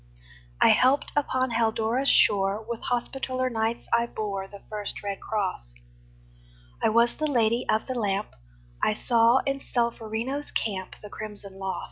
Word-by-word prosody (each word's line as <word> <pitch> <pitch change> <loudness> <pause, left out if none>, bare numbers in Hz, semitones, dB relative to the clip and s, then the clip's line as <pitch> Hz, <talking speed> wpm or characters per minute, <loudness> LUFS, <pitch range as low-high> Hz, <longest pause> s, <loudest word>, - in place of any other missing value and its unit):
I - - +6
helped 265 +3 +4
upon 260 -3 +1
Haldora's 230 +3 +1
shore; 200 +2 +3
With 235 -1 -4
Hospitaller 255 +1 -1
Knights 225 0 -1
I 235 0 +3
bore 200 -4 -4
The 200 0 -13
first 210 -1 -3
red 200 -1 -3
cross; 185 - -3 1.1
I - - +3
was 235 +2 +3
the 310 - 0
Lady 235 -3 +1
of 215 - +2
the 260 - -3
Lamp; 205 -4 -1 0.5
I 215 - +2
saw 235 +2 +4
in 275 0 -1
Solferino's 235 +3 -2
camp 190 -4 -2
The 210 - -8
crimson 200 -2 -8
loss. 190 -1 -3
225 Hz, 145 wpm, -26 LUFS, 205-250 Hz, 1.1 s, I